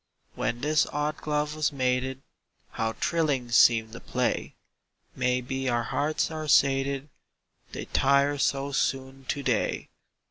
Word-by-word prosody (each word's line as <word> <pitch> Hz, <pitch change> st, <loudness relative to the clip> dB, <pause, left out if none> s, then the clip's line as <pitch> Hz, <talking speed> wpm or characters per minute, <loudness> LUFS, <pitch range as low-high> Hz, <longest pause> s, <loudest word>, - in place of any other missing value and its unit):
When 120 Hz, +1 st, -2 dB
this 155 Hz, +2 st, +2 dB
odd 150 Hz, +1 st, -2 dB
glove 150 Hz, 0 st, -1 dB
was 155 Hz, -1 st, 0 dB
mated, 130 Hz, 0 st, -1 dB, 0.5 s
How 110 Hz, 0 st, -2 dB
thrilling 145 Hz, -8 st, 0 dB
seemed 115 Hz, -1 st, +5 dB
the 115 Hz, -, -8 dB
play! -, -, -2 dB, 0.6 s
May 125 Hz, 0 st, +1 dB
be 130 Hz, +1 st, -3 dB
our 120 Hz, -1 st, +1 dB
hearts 150 Hz, +6 st, -1 dB
are 155 Hz, -1 st, -5 dB
sated 135 Hz, 0 st, +3 dB, 0.6 s
They -, -, -6 dB
tire 140 Hz, +1 st, +2 dB
so 140 Hz, 0 st, 0 dB
soon 135 Hz, 0 st, -2 dB
to 140 Hz, +2 st, -3 dB
day. 125 Hz, -5 st, -1 dB
135 Hz, 135 wpm, -27 LUFS, 125-150 Hz, 0.6 s, seemed